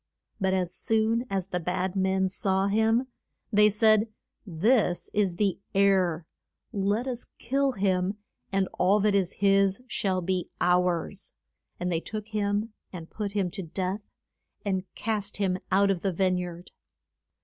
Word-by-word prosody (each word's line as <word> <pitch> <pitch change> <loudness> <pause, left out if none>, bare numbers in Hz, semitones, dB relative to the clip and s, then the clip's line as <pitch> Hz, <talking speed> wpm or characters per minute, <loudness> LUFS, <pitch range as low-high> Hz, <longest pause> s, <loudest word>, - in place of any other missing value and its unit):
But 190 -1 +1
as 180 -2 -1
soon 225 +2 +1
as 190 -2 -2
the 180 - -1
bad 180 +2 -2
men 190 0 +2
saw 190 0 0
him 220 +4 +2 0.5
they 210 +1 +6
said, 215 +1 +4 0.4
This 190 +2 +1
is 200 -4 +1
the 195 0 0 0.2
heir; 185 -4 +3 0.5
let 205 +4 0
us 250 -2 -4
kill 275 +3 0
him, 190 -1 0 0.3
and 195 -1 +1
all 195 +4 +4
that 210 0 +3
is 195 -2 +1
his 195 +2 +2
shall 195 -6 -1
be 185 0 -1
ours. 180 +1 0 0.5
And 180 0 -1
they 165 - +1
took 215 +2 -6
him 210 +1 -1 0.2
and 165 -3 -9
put 205 -2 -4
him 195 -4 0
to 195 +1 -5
death, 185 +4 -3 0.6
and 190 -2 -2
cast 210 -3 -2
him 190 -2 0
out 195 +1 +4
of 180 -3 -2
the 195 - 0
vine 185 +1 +1
yard. 175 0 -7
195 Hz, 150 wpm, -27 LUFS, 185-210 Hz, 0.6 s, they